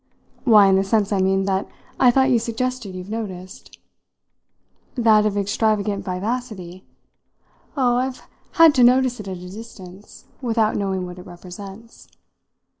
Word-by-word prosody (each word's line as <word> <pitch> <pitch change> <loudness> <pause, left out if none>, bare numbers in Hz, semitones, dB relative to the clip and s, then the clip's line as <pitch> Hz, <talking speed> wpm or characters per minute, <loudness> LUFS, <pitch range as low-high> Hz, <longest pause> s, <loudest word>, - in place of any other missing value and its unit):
"Why, 215 -5 +7
in 190 -1 +4
the 195 - +2
sense, 205 0 0
I 195 - +1
mean, 195 +1 +1
that 195 0 -1 0.3
I 255 - +6
thought 265 +2 +3
you 240 - +4
suggested 230 -3 -4
you've 185 +2 -8
noticed." 190 -5 -7 1.2
"That 220 -4 +4
of 205 -1 -2
extravagant 205 0 0
vivacity? 190 -2 -5 0.9
Oh, 245 -2 +2
I've 255 +1 -3 0.3
had 330 -3 +6
to 255 - +3
notice 250 0 +3
it 210 - -8
at 190 -1 -5
a 180 +1 -10
distance, 200 -3 -12 0.2
without 225 -3 0
knowing 190 -2 -2
what 180 0 -9
it 180 - -12
represents." 195 +5 -12
210 Hz, 145 wpm, -21 LUFS, 190-240 Hz, 1.2 s, Why